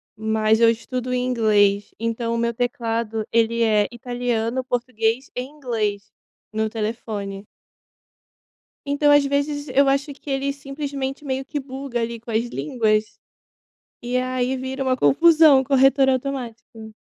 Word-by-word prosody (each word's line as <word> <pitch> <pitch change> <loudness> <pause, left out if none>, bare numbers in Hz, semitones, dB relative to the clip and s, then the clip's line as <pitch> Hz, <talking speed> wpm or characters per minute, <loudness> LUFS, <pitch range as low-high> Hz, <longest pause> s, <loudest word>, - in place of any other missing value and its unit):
mas 220 0 +1
eu 230 - +7
estudo 250 +2 -3
em 250 0 0
inglês, 205 -4 +2
então 230 +1 -2
o - - -1
meu 235 0 0
teclado 230 -2 -2
ele 230 0 +2
é 210 -2 +3
italiano, 245 0 -2
português 245 -1 -1
e 250 - -1
inglês 225 -7 -3 0.4
no 220 0 0
telefone. 210 -3 -4 1.4
Então 285 +1 +2
às 290 -1 +5
vezes 285 +1 -1
eu 275 +2 +3
acho 275 +2 0
que 280 - -10
ele 275 +1 0
simplesmente 275 0 -5
meio 265 -1 -2
que 295 +1 -4
buga 265 -2 -5
ali 230 0 -3
com 235 - -10
as 225 +1 +1
línguas, 215 - 0 1.0
e 245 +1 -1
aí 255 0 -1
vira 260 +1 -4
uma 260 -1 +1
confusão, 310 -2 +6
corretor 270 0 +4
automático. 240 -4 -4
245 Hz, 135 wpm, -22 LUFS, 225-270 Hz, 1.4 s, eu